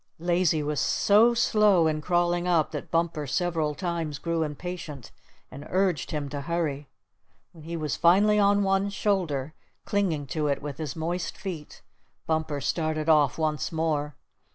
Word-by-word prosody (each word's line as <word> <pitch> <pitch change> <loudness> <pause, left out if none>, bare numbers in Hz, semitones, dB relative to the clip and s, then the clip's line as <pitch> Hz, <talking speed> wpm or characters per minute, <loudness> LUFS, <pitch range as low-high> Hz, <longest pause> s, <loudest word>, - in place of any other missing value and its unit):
Lazy 170 -2 +1
was 150 -1 -1
so 225 +4 +4
slow 210 -6 +4
in 155 -1 0
crawling 175 +1 +1
up 165 -4 +2
that 150 -3 -6
Bumper 165 -3 -1
several 160 -1 -1
times 165 -3 -3
grew 165 +2 -2
impatient 155 -3 -6 0.4
and 140 +3 -9
urged 185 -4 0
him 150 -2 -3
to 145 0 -4
hurry. 150 -3 -2 0.6
When 160 -3 -15
he 170 +1 -4
was 150 -3 -2
finally 205 +5 +4
on 200 0 +4
one 195 +1 +1
shoulder, 170 -9 -1 0.3
clinging 180 -8 0
to 155 -2 0
it 140 -1 0
with 145 -1 -7
his 155 -4 -4
moist 170 +2 -3
feet, 180 -6 -7 0.4
Bumper 160 -3 -1
started 155 0 -1
off 150 -4 +4
once 155 -3 -1
more. 155 -3 -1
160 Hz, 155 wpm, -26 LUFS, 150-180 Hz, 0.6 s, so